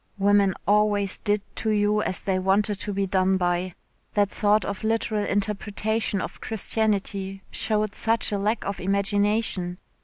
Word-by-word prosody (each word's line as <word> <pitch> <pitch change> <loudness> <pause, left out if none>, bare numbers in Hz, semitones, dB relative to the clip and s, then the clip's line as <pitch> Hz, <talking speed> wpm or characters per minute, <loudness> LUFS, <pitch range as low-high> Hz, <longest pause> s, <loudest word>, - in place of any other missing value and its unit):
Women 200 -1 +3
always 205 -1 +3
did 205 -1 0
to 220 - -1
you 210 0 +2
as 185 - -2
they 190 -1 0
wanted 200 +2 +1
to 205 - -3
be 200 0 0
done 190 0 +2
by. 175 0 -1 0.4
That 205 -1 +2
sort 210 0 +2
of 200 +1 -5
literal 220 -1 0
interpretation 205 0 -1
of - - -7
Christianity 200 -3 -2
showed 215 -1 0
such 225 0 +1
a 205 - 0
lack 215 +3 -1
of 200 0 -3
imagination. 200 -1 0
205 Hz, 150 wpm, -25 LUFS, 195-210 Hz, 0.4 s, Women